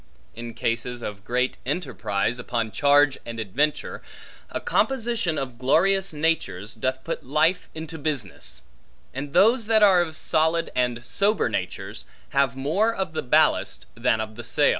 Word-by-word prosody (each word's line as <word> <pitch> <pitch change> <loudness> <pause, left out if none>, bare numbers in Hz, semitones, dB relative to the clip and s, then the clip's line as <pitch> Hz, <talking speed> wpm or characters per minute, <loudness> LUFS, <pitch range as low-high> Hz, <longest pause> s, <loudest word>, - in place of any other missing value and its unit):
In 115 0 -7
cases 120 +1 -2
of 100 -1 -6
great 125 +3 0
enterprise 120 - -1
upon 115 -2 -2
charge 145 +1 +4
and 115 -1 -6
adventure, 135 +9 -1 0.5
a - - -3
composition 235 - 0
of 130 -3 -4
glorious 190 +9 +2
natures, 130 - -1
doth 130 +3 -2
put 165 - -4
life 155 +7 +1
into 160 0 -7
business; 110 - -4 0.5
and 140 +2 -5
those 225 +2 +4
that 220 -1 +5
are 190 -3 +6
of 160 -2 -3
solid 160 +2 +1
and 120 -1 0
sober 205 - +1
natures, - - -4 0.2
have 140 -3 +2
more 175 +12 +1
of 190 -7 -3
the - - -1
ballast, 125 - +2
than 115 -1 +1
of 110 0 -4
the 120 - -6
sail. - - +2
140 Hz, 150 wpm, -24 LUFS, 120-165 Hz, 0.5 s, are